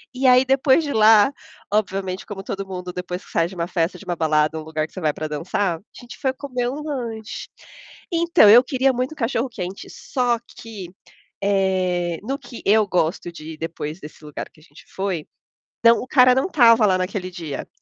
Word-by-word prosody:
E 265 Hz, +1 st, -2 dB
aí 255 Hz, 0 st, +7 dB
depois 270 Hz, +3 st, +3 dB
de 290 Hz, -, -3 dB
lá, 215 Hz, +1 st, +6 dB, 0.4 s
obviamente 195 Hz, -2 st, -1 dB
como 200 Hz, -2 st, -7 dB
todo 195 Hz, 0 st, -4 dB
mundo 180 Hz, -1 st, -6 dB
depois 180 Hz, 0 st, -5 dB
que -, -, -19 dB
você -, -, -1 dB
sai 165 Hz, -, +3 dB
de 185 Hz, -, -11 dB
uma 170 Hz, -1 st, -2 dB
festa, 175 Hz, 0 st, -1 dB
de -, -, -13 dB
uma 175 Hz, -, -2 dB
balada, 155 Hz, -1 st, +1 dB
uma 155 Hz, -, -7 dB
lugar 155 Hz, -1 st, -2 dB
que -, -, -29 dB
você -, -, -6 dB
vai 155 Hz, -2 st, +1 dB
para 155 Hz, -, -4 dB
dançar, 165 Hz, +4 st, -1 dB
a -, -, -19 dB, 0.2 s
gente 245 Hz, -, -11 dB
foi 265 Hz, -1 st, 0 dB
comer 255 Hz, -3 st, -3 dB
um 280 Hz, +4 st, -5 dB
lanche. 235 Hz, -8 st, -5 dB, 0.6 s
Então 335 Hz, -10 st, +5 dB
eu 235 Hz, +4 st, +9 dB
queria 265 Hz, 0 st, +1 dB
muito 255 Hz, +4 st, -2 dB
cachorro 245 Hz, -1 st, -1 dB
quente 190 Hz, -4 st, -6 dB
só 245 Hz, -2 st, -1 dB, 0.2 s
que, 210 Hz, -6 st, -9 dB, 0.5 s
eh, 185 Hz, -3 st, 0 dB
no 270 Hz, +6 st, -3 dB
que 245 Hz, -, -11 dB
eu 215 Hz, +1 st, +4 dB
gosto 175 Hz, -1 st, -1 dB
de 160 Hz, -1 st, -9 dB
ir -, -, -15 dB
depois 160 Hz, 0 st, -5 dB
desse 150 Hz, -1 st, -12 dB
lugar 150 Hz, -1 st, -7 dB
que -, -, -23 dB
a -, -, -21 dB
gente -, -, -17 dB
foi, 190 Hz, -5 st, -3 dB, 0.6 s
não 230 Hz, 0 st, +7 dB
o 255 Hz, -, -7 dB
cara 255 Hz, -1 st, +5 dB
não 265 Hz, -, +2 dB
estava 235 Hz, -, +5 dB
lá 190 Hz, -2 st, +3 dB
naquele 185 Hz, 0 st, -3 dB
dia. 160 Hz, -6 st, -6 dB
195 Hz, 210 wpm, -22 LUFS, 175-245 Hz, 0.6 s, eu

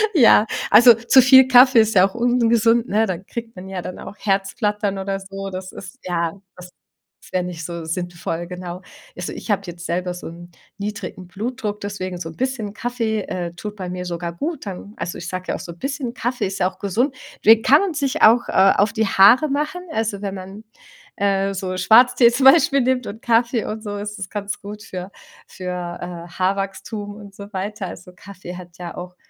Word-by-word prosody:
Ja, 230 Hz, -6 st, +6 dB, 0.3 s
also 235 Hz, +3 st, +9 dB
zu 230 Hz, +4 st, +5 dB
viel 260 Hz, +1 st, +7 dB
Kaffee 255 Hz, -1 st, +7 dB
ist 220 Hz, 0 st, 0 dB
ja 185 Hz, 0 st, +6 dB
auch 195 Hz, -, -13 dB
ungesund, 235 Hz, -1 st, +2 dB
ne? 220 Hz, +2 st, +2 dB
Dann 185 Hz, 0 st, -4 dB
kriegt 230 Hz, +1 st, -7 dB
man 185 Hz, +1 st, -9 dB
ja 190 Hz, -2 st, -4 dB
dann 180 Hz, -, -7 dB
auch -, -, -9 dB
Herzflattern 200 Hz, 0 st, -1 dB
oder 195 Hz, 0 st, -3 dB
so. 195 Hz, 0 st, -7 dB
Das 185 Hz, 0 st, -7 dB
ist, 200 Hz, +6 st, -10 dB
ja 170 Hz, -2 st, -1 dB, 0.2 s
das 180 Hz, 0 st, -11 dB, 0.6 s
wär 185 Hz, -, +1 dB
nicht 175 Hz, -2 st, -6 dB
so 170 Hz, -1 st, -6 dB
sinnvoll, 175 Hz, 0 st, -4 dB
genau. 180 Hz, 0 st, -7 dB, 0.4 s
Also, -, -, -5 dB
ich -, -, -9 dB
hab 200 Hz, -1 st, 0 dB
jetzt 170 Hz, 0 st, -8 dB
selber 180 Hz, +1 st, -2 dB
so 180 Hz, -, -8 dB
'n 175 Hz, +1 st, -11 dB, 0.3 s
niedrigen 200 Hz, -3 st, -6 dB
Blutdruck, 210 Hz, +2 st, -4 dB
deswegen 185 Hz, -3 st, -5 dB
so 165 Hz, -2 st, -5 dB
'n 165 Hz, -, -12 dB
bisschen 250 Hz, -6 st, -3 dB
Kaffee, 230 Hz, -2 st, -2 dB
äh, 175 Hz, -2 st, -5 dB
tut 210 Hz, +3 st, -7 dB
bei 185 Hz, -2 st, -5 dB
mir 180 Hz, 0 st, -5 dB
sogar 170 Hz, -1 st, -4 dB
gut 300 Hz, -, -4 dB
dann 200 Hz, +2 st, -8 dB
also 175 Hz, -, -5 dB
ich 170 Hz, -, -7 dB
sag 185 Hz, 0 st, -5 dB
ja -, -, 0 dB
auch -, -, -6 dB
so 170 Hz, -, -8 dB
'n 170 Hz, -, -22 dB
bisschen, 275 Hz, -3 st, -3 dB
Kaffee 245 Hz, -3 st, -2 dB
ist 195 Hz, +1 st, -5 dB
ja 180 Hz, 0 st, +2 dB
auch -, -, -25 dB
gesund. 235 Hz, +8 st, 0 dB, 0.3 s
Den 225 Hz, +1 st, +7 dB
kann 290 Hz, +3 st, +6 dB
man 395 Hz, -4 st, -1 dB
sich 280 Hz, -3 st, -1 dB
auch, 235 Hz, +2 st, +6 dB
äh, 190 Hz, +1 st, +5 dB
auf 205 Hz, +2 st, +2 dB
die 220 Hz, -2 st, +1 dB
Haare 230 Hz, +11 st, +6 dB
machen. 300 Hz, +6 st, -2 dB
Also, 220 Hz, -6 st, -2 dB
wenn 200 Hz, -1 st, -4 dB
man, 190 Hz, +3 st, -9 dB, 0.5 s
äh, 195 Hz, -1 st, +1 dB
so 185 Hz, -1 st, -4 dB
Schwarztee 245 Hz, +4 st, +6 dB
zum 245 Hz, +3 st, -1 dB
Beispiel 275 Hz, -1 st, +6 dB
nimmt 255 Hz, 0 st, 0 dB
und 220 Hz, +3 st, -8 dB
Kaffee 235 Hz, 0 st, +2 dB
und 215 Hz, +1 st, -5 dB
so, 205 Hz, -2 st, -5 dB
ist 210 Hz, +1 st, -6 dB
das 190 Hz, -2 st, -6 dB
ganz 205 Hz, -1 st, -5 dB
gut 210 Hz, +1 st, -9 dB
für 185 Hz, -3 st, -7 dB, 0.4 s
für, -, -, -18 dB
äh, 175 Hz, -1 st, -6 dB
Haarwachstum 195 Hz, +3 st, -3 dB
und 205 Hz, -2 st, -12 dB
so 200 Hz, +1 st, -10 dB
weiter. 195 Hz, +1 st, -4 dB
Also, 180 Hz, +1 st, -10 dB
Kaffee 185 Hz, -2 st, -10 dB
hat 175 Hz, -1 st, -12 dB
ja 175 Hz, -1 st, -7 dB
auch 180 Hz, 0 st, -8 dB
200 Hz, 205 wpm, -21 LUFS, 180-230 Hz, 0.6 s, also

